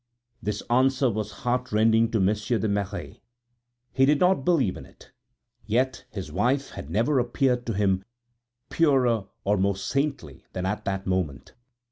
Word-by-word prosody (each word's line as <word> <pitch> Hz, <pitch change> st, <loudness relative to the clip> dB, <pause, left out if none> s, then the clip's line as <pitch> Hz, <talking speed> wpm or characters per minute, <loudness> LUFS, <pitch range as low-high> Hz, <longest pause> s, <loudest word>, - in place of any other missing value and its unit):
This 105 Hz, -, -3 dB
answer 130 Hz, +1 st, +3 dB
was 105 Hz, 0 st, -3 dB
heartrending 115 Hz, -2 st, +2 dB
to 115 Hz, -2 st, 0 dB
Monsieur 105 Hz, +5 st, +1 dB
de 110 Hz, -, -1 dB
Merret; 100 Hz, -6 st, -3 dB, 0.7 s
he 135 Hz, -, +3 dB
did 145 Hz, 0 st, +4 dB
not 180 Hz, -5 st, +3 dB
believe 140 Hz, -, +2 dB
in -, -, -9 dB
it. -, -, -18 dB, 0.6 s
Yet 130 Hz, +4 st, 0 dB
his 95 Hz, -7 st, -6 dB
wife 125 Hz, -, 0 dB
had 70 Hz, -, -8 dB
never 120 Hz, -, +2 dB
appeared 125 Hz, 0 st, 0 dB
to 115 Hz, -, -1 dB
him 95 Hz, -2 st, +1 dB, 0.7 s
purer 125 Hz, -9 st, +3 dB, 0.2 s
or 105 Hz, +1 st, +2 dB
more 100 Hz, 0 st, +1 dB
saintly 130 Hz, -, -3 dB
than 90 Hz, 0 st, -3 dB
at 100 Hz, +3 st, -2 dB
that 95 Hz, 0 st, -2 dB
moment. 90 Hz, -7 st, -2 dB
110 Hz, 150 wpm, -26 LUFS, 100-130 Hz, 0.7 s, did